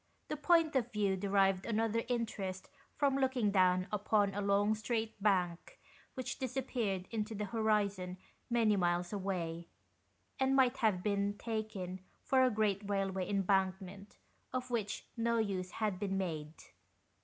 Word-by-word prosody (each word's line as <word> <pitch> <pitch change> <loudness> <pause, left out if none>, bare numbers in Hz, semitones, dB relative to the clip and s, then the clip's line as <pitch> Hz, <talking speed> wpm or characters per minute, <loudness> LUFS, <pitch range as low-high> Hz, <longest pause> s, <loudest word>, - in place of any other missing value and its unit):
The - - -1
point 325 0 +3
of 245 -2 +1
view 205 -3 +1
derived 195 -1 +2
another 225 0 +1
interest 205 -6 -3 0.2
from 275 -2 +2
looking 260 -6 +1
down 185 -1 +4
upon 205 -1 +2
a 205 - -2
long 200 +1 +3
straight 220 0 -3
bank 180 -4 0 0.4
which 255 - -4
disappeared 245 -7 -2
into 220 -1 -2
the 210 0 -2
horizon 205 -4 0 0.3
many 230 -3 +3
miles 175 0 0
away, 170 -4 -3 0.7
and 265 0 +3
might 260 -1 +4
have 210 -6 +1
been 200 0 0
taken 215 -5 -4 0.2
for 265 -1 +3
a 255 - +5
great 210 -3 +1
railway 195 -2 -1
embankment 195 0 -1 0.3
of 255 0 -3
which 215 -4 -2
no 235 0 +1
use 195 -4 -1
had 210 -2 -2
been 195 -2 -1
made. 160 -4 -3
205 Hz, 140 wpm, -34 LUFS, 190-230 Hz, 0.7 s, a